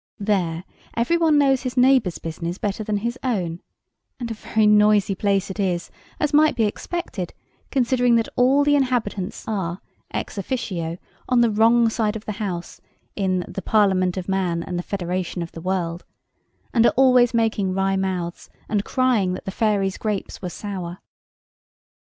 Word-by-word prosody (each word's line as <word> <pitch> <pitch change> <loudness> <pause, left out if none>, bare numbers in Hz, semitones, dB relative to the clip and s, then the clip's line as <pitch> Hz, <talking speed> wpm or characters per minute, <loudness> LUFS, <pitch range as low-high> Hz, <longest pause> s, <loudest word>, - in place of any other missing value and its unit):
There 185 -5 0 0.3
every 240 +9 +2
one 325 -3 +3
knows 270 -2 +3
his 255 -1 -5
neighbour's 250 -8 +4
business 170 +2 -5
better 210 +1 -2
than 210 0 -1
his 240 +2 -2
own; 180 -10 -1 0.6
and 235 -2 -4
a - - -1
very 220 0 0
noisy 210 -1 +4
place 195 0 0
it 190 - -8
is, 180 -3 -1 0.3
as 300 - 0
might 300 -1 +5
be 230 - +2
expected, 210 - -3 0.3
considering 245 -2 +2
that 230 -1 +2
all 265 +3 +4
the 290 0 +4
inhabitants 240 -8 -1
are 190 -4 -2 0.3
ex - - -4
officio 180 -7 -3 0.3
on 250 -2 +4
the 235 -2 +3
wrong 230 +2 +4
side 220 -1 0
of 220 - -7
the - - -3
house 175 -4 -4 0.3
in 185 -3 0
the 195 - -6
"Parliament 190 -3 +2
of 185 - -4
Man, 180 -3 0
and 180 -1 -4
the - - -1
Federation 180 -1 -3
of 170 - -8
the 165 - -9
World;" 175 -1 -2 0.7
and 230 - +4
are - - +2
always 250 -2 +5
making 215 -5 +1
wry 195 0 +1
mouths, 185 -3 -3 0.2
and 205 -2 0
crying 235 -8 +1
that - - -7
the 190 - -3
fairies' 200 -2 0
grapes 210 -3 -3
were 180 - -3
sour. 180 -2 -6
205 Hz, 170 wpm, -23 LUFS, 185-240 Hz, 0.7 s, might